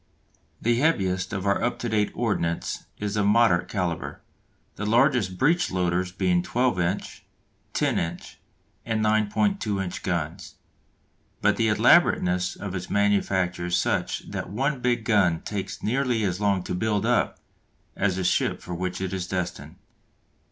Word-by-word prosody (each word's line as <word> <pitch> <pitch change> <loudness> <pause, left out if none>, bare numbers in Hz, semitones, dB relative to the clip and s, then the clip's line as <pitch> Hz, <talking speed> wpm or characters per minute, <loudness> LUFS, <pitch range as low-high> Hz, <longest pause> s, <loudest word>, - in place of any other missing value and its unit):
The 120 +1 +1
heaviest 95 - +1
of 100 -1 -3
our 100 0 +2
up 120 +1 0
to 120 - -3
date 105 -2 +1
ordnance 100 -8 -2
is 105 0 -3
of 105 -1 +2
moderate 105 -5 +4
calibre, 90 -5 -3 0.6
the - - -5
largest 120 -5 +3
breech 170 - +2
loaders 90 0 0
being 90 -2 +1
12 120 +2 0
inch, 85 +3 -2 0.5
10 - - +1
inch, 85 +1 -5 0.4
and 110 -1 -1
9.2 110 - +1
inch 90 - -5
guns. 85 0 -3 0.8
But - - +3
the - - +2
elaborateness 90 0 +3
of 100 -3 -6
its 90 -1 -5
manufacture 95 -3 +1
is 90 0 +1
such - - -1
that - - -4
one 135 +7 -1
big 120 -2 0
gun 90 -8 +3
takes 100 -2 -5
nearly 125 -1 +1
as 95 0 -1
long 100 -3 +2
to - - -4
"build 105 +2 0
up" - - +1 0.6
as 95 -2 +1
the 95 - -2
ship 90 - +1
for 90 - -7
which 90 +1 -3
it 95 -1 -3
is 95 -1 -3
destined. 90 -2 -4
100 Hz, 150 wpm, -25 LUFS, 90-110 Hz, 0.8 s, moderate